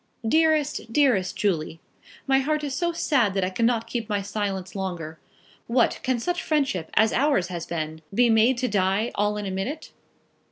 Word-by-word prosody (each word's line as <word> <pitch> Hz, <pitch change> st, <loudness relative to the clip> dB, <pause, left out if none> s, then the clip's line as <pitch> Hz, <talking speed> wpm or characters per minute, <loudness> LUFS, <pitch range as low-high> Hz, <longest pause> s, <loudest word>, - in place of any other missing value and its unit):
DEAREST 310 Hz, -3 st, +2 dB
DEAREST 230 Hz, -9 st, +2 dB
JULIE, 165 Hz, -5 st, -1 dB, 0.5 s
My 270 Hz, -1 st, +3 dB
heart 300 Hz, +2 st, -1 dB
is 285 Hz, -2 st, -3 dB
so 345 Hz, +5 st, 0 dB
sad 260 Hz, -, +1 dB
that 195 Hz, -, +1 dB
I 185 Hz, -, -1 dB
cannot 230 Hz, +3 st, +1 dB
keep 235 Hz, -2 st, -4 dB
my 205 Hz, -1 st, -1 dB
silence 195 Hz, -2 st, -4 dB
longer. 175 Hz, -5 st, -5 dB, 0.5 s
What; 240 Hz, 0 st, +2 dB
can 255 Hz, -1 st, 0 dB
such 355 Hz, +9 st, -2 dB
friendship 275 Hz, -, -1 dB
as 220 Hz, 0 st, +4 dB
ours 270 Hz, -, +2 dB
has 170 Hz, -2 st, -5 dB
been 160 Hz, -1 st, -4 dB
be 240 Hz, +5 st, +3 dB
made 230 Hz, +3 st, +4 dB
to 250 Hz, +1 st, 0 dB
die 200 Hz, +1 st, +1 dB
all 210 Hz, +1 st, 0 dB
in 210 Hz, -, -4 dB
a 190 Hz, -, -3 dB
minute? 245 Hz, +12 st, -4 dB
220 Hz, 175 wpm, -25 LUFS, 190-270 Hz, 0.5 s, as